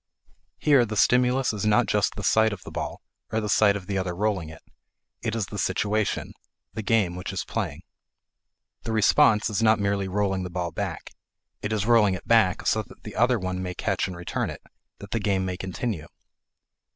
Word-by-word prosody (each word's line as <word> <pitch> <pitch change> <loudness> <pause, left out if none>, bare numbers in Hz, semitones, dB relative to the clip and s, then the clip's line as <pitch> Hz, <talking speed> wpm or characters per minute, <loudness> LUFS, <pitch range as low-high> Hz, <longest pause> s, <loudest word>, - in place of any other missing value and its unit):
Here 140 -4 +4
the 110 -2 -4
stimulus 125 +2 +3
is 105 - -4
not 105 0 +4
just - - +1
the - - -6
sight 110 -1 +3
of 95 - -8
the - - -9
ball, - - -5 0.3
or 110 - +1
the 105 - -3
sight 100 0 +4
of 100 -3 -5
the 95 0 -1
other 90 -2 -3
rolling 95 -4 -1
it. 80 - -13 0.6
It 110 0 -2
is 110 -3 -1
the 105 +2 -7
situation 105 +3 -1 0.4
the 110 - -4
game 105 -5 +1
which 90 - -5
is - - -3
playing. - - -4 1.0
The 115 - -4
response 105 0 +4
is 105 0 -1
not 110 -1 +5
merely 100 -1 0
rolling 95 0 0
the 90 - -4
ball 85 -1 -3
back; - - -5 0.5
it 105 - -3
is 105 -2 0
rolling 110 -5 +4
it 90 - -10
back 110 -6 +3
so - - +2
that - - -16
the - - -8
other 120 +2 +3
one 95 -2 -3
may 90 -1 -4
catch - - -1
and 90 -2 -7
return 85 - -3
it, - - -9 0.3
that 100 - -11
the 115 - 0
game 95 -2 0
may 90 -1 -2
continue. 95 -1 -4
105 Hz, 200 wpm, -25 LUFS, 95-110 Hz, 1.0 s, not